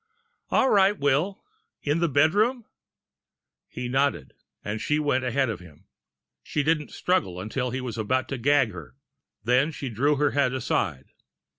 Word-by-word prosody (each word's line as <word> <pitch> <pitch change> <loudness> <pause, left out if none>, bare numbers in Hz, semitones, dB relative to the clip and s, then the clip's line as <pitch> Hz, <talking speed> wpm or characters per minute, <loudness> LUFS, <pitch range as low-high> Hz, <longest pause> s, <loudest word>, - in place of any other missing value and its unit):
"All 265 - +3
right, 200 0 +4
Will. 145 +8 0 0.4
In 150 +3 +1
the 170 -1 +1
bedroom?" 205 - +2 1.0
He 125 0 -5
nodded, 135 - 0 0.3
and 105 +1 -3
she 150 - +1
went 145 -4 +1
ahead 130 +2 +1
of 115 - -4
him. 80 -4 -16 0.6
She 150 - -2
didn't 150 0 0
struggle, 95 - -1
until 125 +6 -3
he 130 +2 -3
was 120 -3 -5
about 130 +5 0
to 135 - -4
gag 135 -2 +3
her. 75 -9 -10 0.5
Then 125 +6 +3
she 135 -2 -5
drew 140 +7 +1
her 145 +1 +1
head 140 -3 +1
aside. 70 - -2
135 Hz, 155 wpm, -26 LUFS, 115-150 Hz, 1.0 s, right